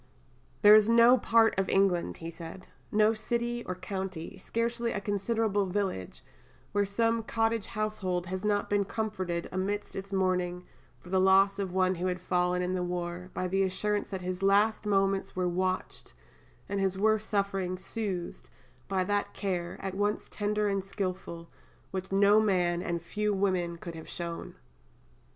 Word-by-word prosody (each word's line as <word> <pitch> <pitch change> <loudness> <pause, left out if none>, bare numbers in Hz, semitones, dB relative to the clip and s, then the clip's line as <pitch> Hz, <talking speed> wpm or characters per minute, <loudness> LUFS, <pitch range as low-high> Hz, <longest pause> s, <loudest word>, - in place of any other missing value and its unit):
"There 210 0 +10
is 215 0 +7
no 235 +2 +7
part 230 -2 +4
of 195 - 0
England," 190 -3 +2
he 165 0 -6
said, 170 +2 -9 0.3
"no 215 +1 +4
city 235 +2 -2
or 185 - -2
county, 190 -2 -5
scarcely 235 +3 -1
a - - -1
considerable 205 0 0
village, 185 - -3 0.5
where 205 0 +2
some 230 +3 +1
cottage 225 -1 0
household 205 -5 -2
has 185 +2 -4
not 205 -1 +1
been 205 0 +2
comforted 190 -5 -3
amidst 200 +3 -2
its 195 +1 -6
mourning 180 -2 0 0.3
for 180 - -14
the 190 -1 +3
loss 195 +1 +5
of 195 -2 -2
one 185 0 +2
who 180 +1 -2
had 180 0 -1
fallen 180 0 +1
in 180 +1 -1
the 185 - -1
war, 175 0 -4
by 185 - -1
the 195 +2 +1
assurance 205 +2 0
that 190 -1 -4
his 180 +1 -3
last 205 +2 +3
moments 195 -1 +1
were 185 -1 0
watched, 185 +1 -2 0.5
and 200 - -2
his 190 -1 0
worst 215 +1 +2
sufferings 195 -3 -1
soothed, 195 -6 -4 0.4
by 190 -1 +1
that 205 +2 -1
care, 180 -4 -2
at 195 -1 -3
once 205 +2 -1
tender 210 0 0
and 195 -1 0
skilful, 185 -3 -5 0.4
which 190 0 -4
no 200 +2 +5
man, 180 -5 +2
and 170 -2 -3
few 210 +3 -1
women, 185 -3 0
could 170 0 -7
have 160 -1 -9
shown. 170 -1 -6
195 Hz, 165 wpm, -29 LUFS, 180-210 Hz, 0.5 s, There